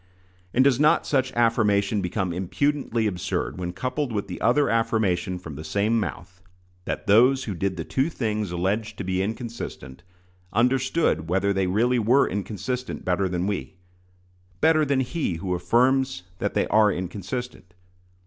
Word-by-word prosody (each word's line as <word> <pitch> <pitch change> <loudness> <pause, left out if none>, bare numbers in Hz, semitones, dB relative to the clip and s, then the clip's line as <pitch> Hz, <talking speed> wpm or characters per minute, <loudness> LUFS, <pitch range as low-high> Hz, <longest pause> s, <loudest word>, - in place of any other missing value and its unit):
And 130 - +4
does 135 -2 +3
not 150 +1 +4
such 130 -2 +1
affirmation 105 -3 +2
become 90 0 -2
impudently 120 +6 -1
absurd 90 -2 -2
when 90 -1 -3
coupled 130 +7 -3
with 100 -2 -2
the 90 - -7
other 125 +6 +3
affirmation 110 -5 0
from 80 -4 -9
the 75 +2 -8
same 100 +8 +1
mouth, 95 -3 -6 0.4
that - - -4
those 125 +6 +5
who 105 - -4
did 95 +1 -2
the 80 - -3
two 135 - 0
things 110 - -2
alleged 100 +5 -2
to - - -4
be 95 0 -1
inconsistent, 110 - -6 0.5
understood 125 - +1
whether 95 +2 +1
they 95 -1 0
really 120 +6 +2
were 125 +5 +4
inconsistent 120 +6 -4
better 90 +1 +1
than 90 0 -1
we 100 -1 -3 0.8
better 155 0 +4
than 140 -2 +1
he 130 - -2
who 90 +2 -3
affirms 120 +4 +2 0.2
that - - -2
they - - +2
are 105 -1 +5
inconsistent? 95 +2 -5
105 Hz, 155 wpm, -25 LUFS, 95-125 Hz, 0.8 s, those